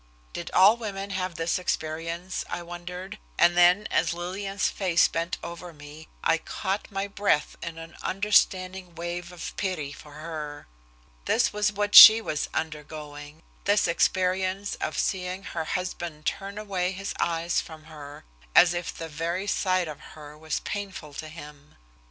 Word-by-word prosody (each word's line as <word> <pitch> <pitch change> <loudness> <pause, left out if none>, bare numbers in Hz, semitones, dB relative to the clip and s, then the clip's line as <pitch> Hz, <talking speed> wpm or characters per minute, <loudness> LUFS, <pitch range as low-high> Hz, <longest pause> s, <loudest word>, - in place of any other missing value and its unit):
Did - - -5
all 200 +5 +6
women 200 -3 -5
have 185 -2 -3
this 165 +2 0
experience 165 +1 -3
I 175 - -4
wondered, 180 +4 -8 0.2
and 175 0 +5
then 180 +4 +5
as - - +1
Lillian's 195 +3 -2
face 180 -4 +2
bent 165 +2 -2
over 170 0 -8
me 150 +1 -12 0.2
I 165 - +3
caught 195 +5 -3
my 195 -1 -3
breath 200 -6 0
in 165 -1 -6
an 165 +1 -10
understanding 185 -2 +1
wave 175 +1 -5
of 180 - -7
pity 180 -8 -2
for 145 +1 -12
her. 150 -1 -7 0.6
This - - +2
was 210 0 +1
what 205 0 -2
she 220 +1 +13
was 155 -9 -3
undergoing, 150 -1 -6 0.2
this 205 0 +3
experience 185 +3 +1
of - - -2
seeing 185 0 -2
her 165 -4 -4
husband 175 -4 -4
turn 200 +1 -3
away 190 -3 -2
his 195 +2 -5
eyes 170 0 0
from 160 -1 -12
her, 150 - -11 0.3
as 175 -1 +7
if 175 -1 -3
the 165 - -7
very 165 +5 -3
sight 185 -3 +1
of 150 -2 -7 0.2
her 150 -1 -11
was 160 +1 -3
painful 195 -7 -6
to 155 - -7
him. 150 -2 -12
175 Hz, 155 wpm, -26 LUFS, 160-190 Hz, 0.6 s, she